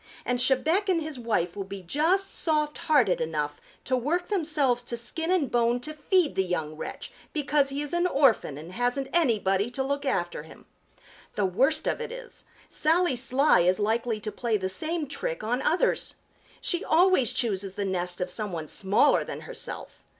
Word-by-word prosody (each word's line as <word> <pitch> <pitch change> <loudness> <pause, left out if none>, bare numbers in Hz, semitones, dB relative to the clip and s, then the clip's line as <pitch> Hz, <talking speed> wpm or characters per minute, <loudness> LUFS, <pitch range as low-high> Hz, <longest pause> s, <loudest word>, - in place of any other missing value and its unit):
And 245 0 0
Chebec 315 +11 +2
and 360 -3 +3
his 310 -4 -5
wife 210 -7 -1
will 200 - -3
be 195 0 -8
just 335 - +1
soft 300 -2 0
hearted 245 - +4
enough 150 -2 -3 0.2
to 255 - 0
work 305 +9 -1
themselves 300 - +1
to 240 -1 -5
skin 320 +8 -3
and 355 -8 +1
bone 240 0 +2
to 310 +4 -6
feed 315 +2 +1
the 190 - +1
young 160 -4 -3
wretch - - -7 0.2
because 290 -2 +1
he 280 +2 -3
is 295 - -4
an 345 +1 +2
orphan 270 - +2
and 160 +4 -9
hasn't 245 +6 -1
anybody 215 - +2
to 265 +2 -2
look 280 +1 -2
after 175 - -1
him. 160 - -15 0.7
The 205 - +1
worst 265 - +2
of - - -1
it 465 0 -5
is, - - -10 0.2
Sally 325 -2 +2
Sly 265 +4 +3
is 180 +1 +3
likely 225 +1 0
to 215 - -4
play 230 -2 -1
the 190 -1 -3
same 315 - -2
trick 165 - -3
on 245 +4 -1
others. 340 - +1 0.5
She 350 -1 0
always 330 - +4
chooses 200 -6 -1
the 200 - -2
nest 180 -2 -2
of 180 0 -2
some 210 0 -3
one 160 -3 -5
smaller 200 +1 +3
than - - -7
herself. - - -6
245 Hz, 185 wpm, -27 LUFS, 195-310 Hz, 0.7 s, hearted